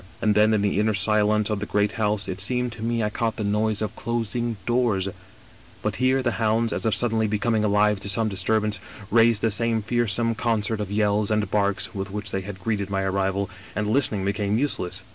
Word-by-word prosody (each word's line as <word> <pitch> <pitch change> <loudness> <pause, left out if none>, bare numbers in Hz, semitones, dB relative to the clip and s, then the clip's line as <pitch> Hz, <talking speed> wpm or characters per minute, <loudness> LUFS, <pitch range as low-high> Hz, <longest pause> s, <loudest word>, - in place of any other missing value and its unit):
And 105 - +2
then 105 +1 +4
in 100 - +1
the 100 -1 +1
inner 105 0 +2
silence 105 +1 +2
of 105 - -1
the 105 - -4
great 105 0 +1
house 105 -2 -1
it 95 0 -2
seemed 125 +3 0
to 115 -1 -9
me 115 0 0
I 105 - -1
caught 115 0 -1
the 110 - -4
noise 105 +1 0
of 110 0 -4
closing 115 0 -2
doors; 120 -6 +1 0.8
but - - -1
here 130 +2 +2
the 120 - +1
hounds, 115 +1 +1
as - - -1
if 110 - +2
suddenly 110 -2 +3
becoming 110 +1 0
alive 105 0 +3
to 100 - -5
some 110 +3 +1
disturbance, 105 +2 0 0.3
raised 115 -1 +4
the 115 - +2
same 115 +1 0
fearsome 115 0 0
concert 110 -1 -1
of 100 - -4
yells 105 0 +1
and 105 -3 0
barks 100 0 0
with 100 -1 -4
which 105 0 -4
they 95 - -1
had 95 0 -8
greeted 100 -3 -1
my 95 -1 -1
arrival, 95 +1 0 0.3
and 105 0 -1
listening 110 -6 +1
became 100 +1 0
useless. 120 -9 -2
105 Hz, 210 wpm, -24 LUFS, 100-115 Hz, 0.8 s, then